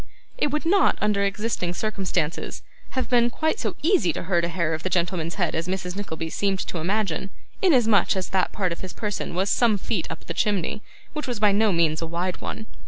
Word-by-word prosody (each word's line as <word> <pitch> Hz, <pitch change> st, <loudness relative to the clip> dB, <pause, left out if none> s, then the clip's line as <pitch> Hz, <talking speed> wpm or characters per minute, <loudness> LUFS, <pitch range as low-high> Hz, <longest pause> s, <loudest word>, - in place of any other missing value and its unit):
It -, -, +1 dB
would 300 Hz, +3 st, -2 dB
not, 390 Hz, +4 st, +4 dB
under 210 Hz, -1 st, +2 dB
existing 200 Hz, -3 st, -1 dB
circumstances, 180 Hz, -6 st, -2 dB, 0.3 s
have 260 Hz, -, +1 dB
been 240 Hz, -1 st, +4 dB
quite 315 Hz, -, 0 dB
so -, -, -2 dB
easy 340 Hz, -, +4 dB
to -, -, -4 dB
hurt 175 Hz, -1 st, +1 dB
a -, -, +2 dB
hair 170 Hz, -2 st, 0 dB
of 160 Hz, -, -3 dB
the 185 Hz, -, -2 dB
gentleman's 170 Hz, -2 st, 0 dB
head -, -, 0 dB
as 165 Hz, +2 st, -2 dB
Mrs. 180 Hz, -1 st, -3 dB
Nickleby 165 Hz, -5 st, -4 dB
seemed 195 Hz, -1 st, +1 dB
to 170 Hz, -, -4 dB
imagine, 195 Hz, +1 st, -1 dB, 0.3 s
inasmuch 235 Hz, -, +4 dB
as 190 Hz, -1 st, -2 dB
that 190 Hz, -1 st, +1 dB
part 185 Hz, -4 st, -1 dB
of 170 Hz, -, -5 dB
his 185 Hz, -, -6 dB
person 210 Hz, -5 st, -3 dB
was 190 Hz, +2 st, +1 dB
some 230 Hz, -4 st, +4 dB
feet -, -, -2 dB
up -, -, -7 dB
the -, -, -4 dB
chimney, 205 Hz, -1 st, 0 dB, 0.3 s
which 300 Hz, -2 st, -4 dB
was 245 Hz, -4 st, -2 dB
by 210 Hz, -1 st, +5 dB
no 210 Hz, +1 st, +3 dB
means 165 Hz, -2 st, +2 dB
a 165 Hz, -, -2 dB
wide 175 Hz, +2 st, -2 dB
one. 220 Hz, -, -5 dB
195 Hz, 215 wpm, -25 LUFS, 170-220 Hz, 0.3 s, by